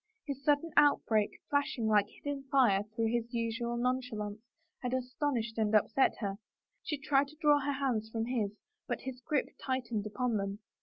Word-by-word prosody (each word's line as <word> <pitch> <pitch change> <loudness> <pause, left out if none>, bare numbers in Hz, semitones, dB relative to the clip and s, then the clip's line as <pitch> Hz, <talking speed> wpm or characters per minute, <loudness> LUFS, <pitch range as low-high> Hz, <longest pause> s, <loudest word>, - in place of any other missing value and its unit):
His 275 -2 -5
sudden 295 +3 +2
outbreak, 230 -7 +4 0.2
flashing 285 -5 +1
like 210 -2 +4
hidden 280 +4 -6
fire 240 -9 +4
through 225 -1 +1
his 235 0 -1
usual 235 +1 -1
nonchalance, 240 -4 -1 0.4
had 250 0 -1
astonished 250 -3 -2
and 215 0 +2
upset 220 +5 +3
her; 200 -1 -2 0.4
she 300 - -3
tried 275 0 +2
to 300 - -14
draw 295 -3 +5
her 285 +1 -1
hands 250 -6 -1
from 225 0 -2
his, 230 -5 0 0.4
but - - -2
his 260 -1 -6
grip 290 +2 0
tightened 240 -5 -1
upon 240 +1 0
them. 200 0 -2
245 Hz, 165 wpm, -32 LUFS, 220-275 Hz, 0.4 s, draw